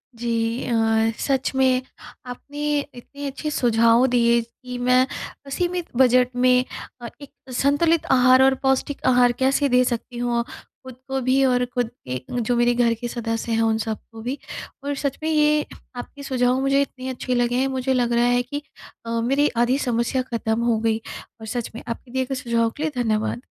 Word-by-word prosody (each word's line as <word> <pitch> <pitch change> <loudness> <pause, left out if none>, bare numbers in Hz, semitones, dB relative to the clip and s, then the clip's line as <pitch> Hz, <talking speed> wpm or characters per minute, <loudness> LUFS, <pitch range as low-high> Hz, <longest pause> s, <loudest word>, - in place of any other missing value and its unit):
जी। 230 +1 -1
अ, 225 -1 +2
सच 270 -2 0
में 260 -1 +3 0.4
आपने 290 +4 -3 0.2
इतने 280 +4 -9
अच्छे 280 +3 -4
सुझाव 230 -2 +4
दिए 235 -1 +3
कि 250 +2 -9
मैं 250 +1 +3 0.4
असीमित 355 +4 -2
बजट 250 -1 +5
में 250 0 +4 0.4
अ, 240 - -5
एक 285 - -10 0.2
संतुलित 295 +5 +2
आहार 255 0 +6
और 265 0 +4
पौष्टिक 265 +1 0
आहार 245 -1 +5
कैसे 275 +2 +2
दे 250 0 +4
सकती 240 0 -3
हूँ, 240 -1 0 0.4
खुद 260 -1 -10
को 270 0 -1
भी 260 +2 +2
और 250 -1 +2
खुद 245 -2 0 0.2
के 125 0 -3 0.2
जो 240 +2 0
मेरे 240 0 +3
घर 240 -1 +2
के 240 - -2
सदस्य 230 -1 -3
हैं, 225 0 +2
उन 225 -1 +2
सब 220 -1 -3
को 225 0 -10
भी 250 +5 -3 0.5
और 285 0 -2
सच 280 -1 -2
में, 315 - 0
ये 300 -1 +3 0.3
आपके 280 +3 -8
सुझाव 255 -1 +1
मुझे 275 +1 +3
इतने 260 -2 -4
अच्छे 255 0 -3
लगे 245 0 +1
हैं, 260 +2 +2
मुझे 265 0 -1
लग 240 -2 +1
रहा 235 0 +3
है 245 0 +3
कि 285 +4 -5 0.4
अ, - - -6
मेरी 275 +5 +2
आधी 240 +3 +3
समस्या 235 +2 0
ख़त्म 225 -1 0
हो 235 -2 +1
गई 220 0 +1 0.4
और - - -7
सच 240 +1 -4
में - - -6
आपके 235 +1 -6
दिए 260 0 0
गए 270 - -3
सुझाव 235 -2 0
के 300 - -3
लिए 315 - 0
धन्यवाद। 220 +1 -1
250 Hz, 190 wpm, -23 LUFS, 235-270 Hz, 0.5 s, आहार